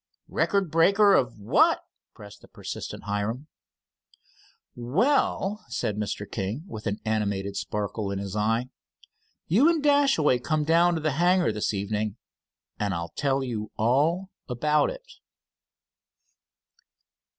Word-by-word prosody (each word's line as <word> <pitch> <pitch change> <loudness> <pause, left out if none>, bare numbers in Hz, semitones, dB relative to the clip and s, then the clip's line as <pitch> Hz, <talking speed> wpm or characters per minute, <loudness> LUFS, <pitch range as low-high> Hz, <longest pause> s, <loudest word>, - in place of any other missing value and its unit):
"Record 195 -5 0
breaker 200 +5 +5
of 125 -9 +2
what?" 100 - +3 0.3
pressed 105 0 -13
the - - -16
persistent - - -7
Hiram. 105 +6 -3 1.3
"Well," 195 - +1
said 105 - -2
Mr. 105 -1 -3
King 105 +8 -4
with 110 - -7
an 100 0 -2
animated 100 -2 -1
sparkle 105 0 -3
in 100 - -3
his 100 0 -5
eye, 115 +4 0 0.8
"you 240 - +4
and 325 -4 +1
Dashaway 275 - +3
come 155 +4 0
down 170 +3 +3
to 160 - -2
the 155 0 0
hangar 180 -4 +3
this 105 -1 -1
evening, 105 +1 -2 0.6
and 100 -3 -1
I'll 85 0 -5
tell 135 -1 0
you 110 -4 -4
all 155 - +1 0.2
about 150 +5 +2
it." - - -8
125 Hz, 125 wpm, -26 LUFS, 105-175 Hz, 1.3 s, breaker